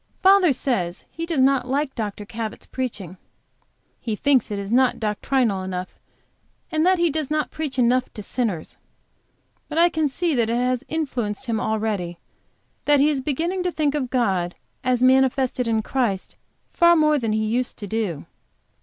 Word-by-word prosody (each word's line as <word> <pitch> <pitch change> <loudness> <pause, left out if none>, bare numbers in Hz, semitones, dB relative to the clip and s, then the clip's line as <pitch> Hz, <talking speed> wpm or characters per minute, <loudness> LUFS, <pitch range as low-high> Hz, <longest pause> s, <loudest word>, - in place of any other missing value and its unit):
Father 380 -3 +6
says 200 -10 -2
he 330 0 -5
does 320 -6 +1
not 265 -1 +3
like 275 +1 -1
Dr. 210 -2 -4
Cabot's 220 +1 -6
preaching. 205 -9 -5 0.8
He 225 -3 -3
thinks 265 +1 +2
that 205 - -4
it - - -3
is 200 - -7
not 255 +1 +3
doctrinal 215 -1 0
enough, 185 -1 -5 0.7
and 315 -1 +1
that 375 0 +4
he 340 -2 +2
does 305 -2 -2
not 305 0 -1
preach 295 -4 -4
enough 250 +1 +2
to 210 - -6
sinners. 200 -7 -3 0.9
But 310 - -4
I 340 +1 +6
can 315 -3 0
see 335 +4 -1
that 235 -4 +1
it 230 - +1
has 250 0 0
influenced 260 -9 -3
him 230 -3 -1
already, 215 -6 -2 0.7
and - - -44
that 290 -1 +4
he 295 +2 +4
is 275 -3 -1
beginning 330 +7 -1
to 360 0 -1
think 300 -4 0
of 275 -4 -2
God, 190 -9 0 0.3
as 255 -1 +1
manifested 260 -1 +3
in 220 -1 +1
Christ, 225 -8 -1 0.4
far 340 0 +5
more 305 -2 +3
than 225 -3 -1
he 215 0 0
used 245 +3 -1
to 205 - -6
do. 200 -7 -3
255 Hz, 180 wpm, -23 LUFS, 215-295 Hz, 0.9 s, Father